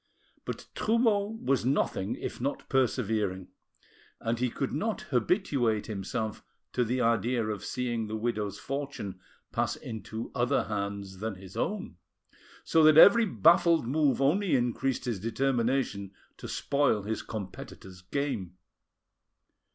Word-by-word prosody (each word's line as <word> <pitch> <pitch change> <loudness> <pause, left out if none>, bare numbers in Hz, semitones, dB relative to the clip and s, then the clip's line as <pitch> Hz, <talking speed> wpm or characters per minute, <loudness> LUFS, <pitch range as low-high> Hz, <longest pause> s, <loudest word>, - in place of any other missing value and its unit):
But - - -5
Trumeau 220 -2 +1
was 135 -2 +2
nothing 115 -6 0
if - - -6
not 140 +3 -3
persevering, 110 -8 0 0.7
and 115 +1 -1
he 125 0 +1
could 135 +3 -3
not 215 +8 -1
habituate 125 - +1
himself 110 +1 -4 0.3
to 125 - +2
the 125 +2 0
idea 115 0 +2
of 105 -1 -3
seeing 120 -3 -2
the 110 - -4
widow's 105 -3 -2
fortune 135 -9 -5 0.3
pass - - 0
into 110 +1 -6
other 120 0 +1
hands 100 -2 -4
than 110 0 -3
his 95 0 -12
own, 200 - -3 0.7
so 160 - +3
that 155 0 +7
every 225 +7 +9
baffled 170 -3 +4
move 140 +2 +2
only 170 +3 +3
increased 125 +1 0
his 115 -5 -2
determination 115 -3 0 0.2
to - - -8
spoil 140 -7 +1
his 110 +2 -2
competitor's 95 -3 -8
game. 100 -4 -3
120 Hz, 130 wpm, -29 LUFS, 105-140 Hz, 0.7 s, every